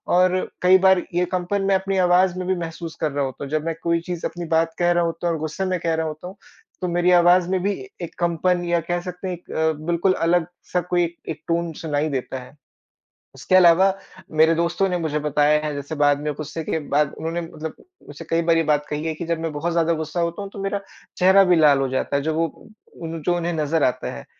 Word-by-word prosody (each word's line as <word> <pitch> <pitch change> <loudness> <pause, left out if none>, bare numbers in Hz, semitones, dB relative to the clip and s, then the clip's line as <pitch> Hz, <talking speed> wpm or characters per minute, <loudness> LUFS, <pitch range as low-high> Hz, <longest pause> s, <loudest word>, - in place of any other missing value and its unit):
और 185 0 +4 0.3
कई 185 +1 +6
बार 190 -1 +5
ये 180 +1 +2
कंपन 185 +2 -1
मैं 195 0 +3
अपनी 190 +1 -1
आवाज़ 180 0 +3
में 185 - -4
भी 190 - +1
महसूस 165 -1 -6
कर 155 - 0
रहा 140 0 -1
होता 130 +1 -6
हूँ। - - -8
जब 155 0 -1
मैं 165 - -1
कोई 170 0 +2
चीज़ 175 -1 -5
अपनी 175 0 -7
बात 165 0 +2
कह 175 0 +3
रहा 175 0 +2
होता 165 +1 -3
हूँ 170 - +1
और - - -5
गुस्से 155 +5 -3
में 185 -1 -1
कह 165 -1 -1
रहा 160 0 -1
होता 155 +3 -7
हूँ, 190 - -9 0.5
तो 180 - -1
मेरी 175 +1 +2
आवाज़ 175 0 +5
में 190 0 +1
भी 200 - +1 0.3
एक 170 - -6
कंपन 175 +1 +1
या 170 0 +1
कह 175 0 0
सकते 180 +1 -6
हैं 185 - -2
एक 175 - -16
अ, 160 0 +1
बिल्कुल 175 +2 +2
अलग-सा 175 +1 -1
कोई 175 +1 0
एक 170 0 -3
एक, 155 - -6
टोन 170 0 0
सुनाई 150 -1 0
देता 130 -1 -3
है। 125 +3 -13 0.8
उसके - - -2
अलावा, 185 +2 +6 0.4
मेरे 160 +1 +4
दोस्तों 170 +3 0
ने 180 -1 -1
मुझे 155 -3 -1
बताया 150 0 +2
है 150 - -3
जैसे 145 +2 -5
बाद 145 0 +3
में 150 0 -2
गुस्से 155 +2 -6
के 160 - -1 0.2
बाद 150 -1 +2
उन्होंने, 165 +2 -3
मतलब 160 -1 -7 0.3
मुझसे - - -9
कई 165 0 +2
बार 165 0 +3
ये 165 - +3
बात 150 0 0
कही 150 +1 -3
है 160 - -1
कि 165 +2 -6
जब 170 0 -1
मैं 165 -1 -3
बहुत 155 +4 -2
ज़्यादा 170 0 +2
गुस्सा 160 +3 -3
होता 170 +3 -2
हूँ 200 - -7
तो - - -10
मेरा 195 +1 -2 0.4
चेहरा 190 +2 +6
भी - - +5
लाल 150 -3 +5
हो 135 - 0
जाता 130 +2 -1
है, 140 - -1
जो 160 +2 -1
वो 165 +6 -3 0.5
जो 175 +3 0
उन्हें 175 0 -2
नज़र 155 0 +1
आता 125 - -1
है। - - -10
170 Hz, 245 wpm, -22 LUFS, 155-180 Hz, 0.8 s, कई